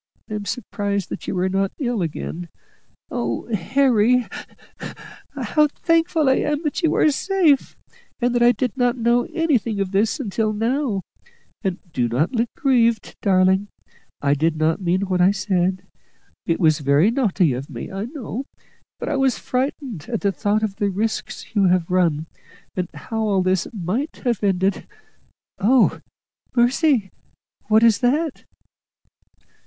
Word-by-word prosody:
I - - -7
am 210 -1 -4
surprised 200 -4 -3
that - - -7
you 190 - -2
are 180 +1 +1
not 195 +1 0
ill 245 -7 -1
again. 170 +1 -4 0.6
Oh, 120 -1 -2
Harry," 230 +4 +3
(with 250 -1 -1
fresh - - -11
sobs), - - -9
"how 300 -1 +4
thankful 330 -2 +2
I 265 - +4
am 295 +2 -1
that 300 +3 -2
you 325 - +2
are 305 - +4
safe, 335 -2 +1 0.4
and 245 -1 +1
that 240 - +1
I 240 0 +7
did 245 -1 -2
not 245 -1 +1
know 240 +1 +2
anything 255 - 0
of 195 -1 -1
this 210 +8 +1
until 215 -3 -1
now! 225 -2 -1 0.6
And 190 -3 -1 0.2
do 120 -2 +1
not 130 - 0
look 235 -2 0
grieved, 235 -7 +2
darling; 190 +1 +3 0.6
I 140 0 +3
did 160 +3 +1
not 160 +4 +1
mean 180 +1 +1
what 185 -2 0
I 180 - +6
said. 185 -2 0 0.6
It 165 - +1
was 155 -4 +3
very 145 +8 +3
naughty 200 - +2
of 130 +3 -6
me, 120 -5 -7
I 195 +2 -4
know, 260 -1 -6 0.5
but - - -5
I 295 - 0
was 270 -2 +2
frightened 255 - -3
at 230 -3 -2
the 200 - +2
thought 210 +2 0
of 200 -2 -2
the 205 - +1
risks 215 +4 -3
you 200 -3 +3
have 180 -1 +2
run, 165 -4 +2 0.5
and 180 -1 -1
how 190 +9 -6
all 205 -4 +1
this 185 -1 +1
might 215 - -3
have 235 -5 0
ended. 190 0 +1 0.7
Oh, 240 +5 +3 0.6
mercy! 245 - +2 0.6
what 220 +1 +4
is 230 -3 +5
that?" 285 +5 0
210 Hz, 160 wpm, -22 LUFS, 185-250 Hz, 0.7 s, I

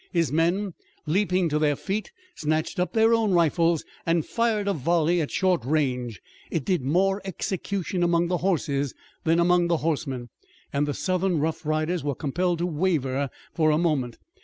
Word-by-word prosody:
His 165 -6 +1
men, 175 +5 +1 0.3
leaping 185 +2 +2
to 150 0 +1
their 150 -1 +2
feet, 200 +7 -3 0.2
snatched 155 - -1
up 180 - 0
their 225 0 +4
own 220 -4 +2
rifles 165 -1 +2 0.2
and 165 -1 +1
fired 225 -3 0
a 200 - +2
volley 170 +3 +2
at 150 - -2
short 185 -8 +1
range. 125 - -1 0.3
It 160 -5 -2
did 180 -5 +1
more 190 +9 +1
execution 190 0 -3
among 170 0 +2
the 180 +1 0
horses 145 -7 0 0.3
than 165 +1 +3
among 175 0 +4
the 170 -1 +2
horsemen, 135 -6 -2 0.4
and 145 +1 +1
the 145 - -2
Southern 185 -2 0
rough 160 +1 -2
riders 155 +2 0
were 145 -2 -1
compelled 175 +5 -1
to 170 - -1
waver 145 -6 0 0.2
for 155 -2 +3
a 150 - +3
moment. 145 -8 0
170 Hz, 170 wpm, -25 LUFS, 150-185 Hz, 0.4 s, their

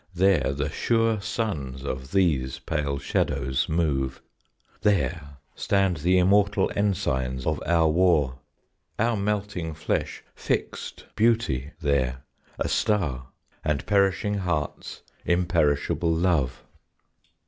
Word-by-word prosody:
There 90 -7 +3
the 70 +2 -2
sure 115 +2 +1
suns 75 - -3
of 65 -1 -5
these 75 -9 +1
pale 70 -2 -2
shadows 65 -1 -1
move; 70 -5 0 0.6
There 85 -8 0 0.2
stand 95 -3 +1
the 90 +5 +2
immortal 100 +2 +3
ensigns 65 -11 -1
of 75 -2 -1
our 85 -1 +4
war; 80 -6 +2 0.6
Our 115 +1 +2
melting 100 -5 -2
flesh 80 - -2
fixed - - -3
Beauty 105 - +1
there, 65 -4 0 0.3
a - - -1
star, 75 - 0 0.4
And 75 -2 -1
perishing 100 0 +2
hearts, 85 -6 -3 0.2
imperishable 85 -2 +1
Love.... 80 -7 +1
80 Hz, 105 wpm, -25 LUFS, 70-100 Hz, 0.6 s, our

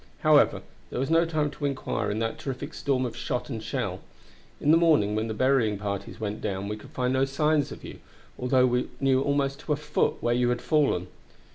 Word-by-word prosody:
However, - - +4 0.3
there - - -4
was 135 +4 -1
no 165 +1 +5
time 155 -3 -1
to 145 +1 -5
inquire 140 -2 -2
in 105 - -2
that 115 0 -2
terrific 140 +3 -5
storm 130 -2 0
of 120 - -5
shot 120 +3 -3
and 115 -3 -4
shell. 110 - -3 0.6
In 150 - +3
the - - +7
morning 155 -12 +4
when 110 +1 -1
the 110 - -3
burying 125 -4 +2
parties 100 +1 -5
went 105 -1 -4
down 100 -1 -3
we 105 - -3
could 105 - -13
find 125 0 -1
no 130 0 +2
signs 150 +2 +1
of - - -9
you, - - -9 0.4
although 125 0 +3
we 125 0 0
knew 135 -1 +3
almost 140 0 0
to 150 - -1
a - - +1
foot 150 0 0
where 120 - +1
you 120 0 +2
had 120 0 0
fallen. 145 - +1
130 Hz, 220 wpm, -27 LUFS, 110-145 Hz, 0.6 s, the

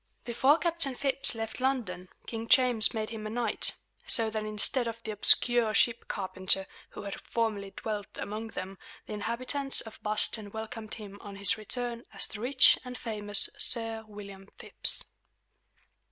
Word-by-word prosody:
Before 260 +5 +2
Captain 335 -6 -1
Phips 275 -1 0
left 225 +1 -6
London, 210 -9 -3 0.2
King 225 0 -6
James 245 -4 +4
made 220 -1 -5
him 215 -2 -7
a - - -6
knight; 235 +1 -1 0.3
so 225 -2 +4
that, 215 -1 -4
instead 215 +4 +2
of 230 0 -5
the 220 - -5
obscure 225 +1 +5
ship 235 -1 +1
carpenter 190 -1 0 0.2
who - - -10
had 200 -1 -7
formerly 215 -4 -3
dwelt 210 0 -6
among 215 +2 -6
them, 195 -3 -8 0.3
the - - -8
inhabitants 255 +6 -3
of 220 - -13
Boston 210 0 0
welcomed 220 +1 -8
him 205 -3 -11
on 200 -1 -10
his 200 -1 +3
return 235 +2 -4
as 195 - +1
the 210 - -7
rich 255 +2 +5
and 250 -1 -8
famous 210 -3 +2
Sir 225 -2 0
William 200 -2 -12
Phips. - - +2
220 Hz, 155 wpm, -28 LUFS, 205-240 Hz, 0.3 s, obscure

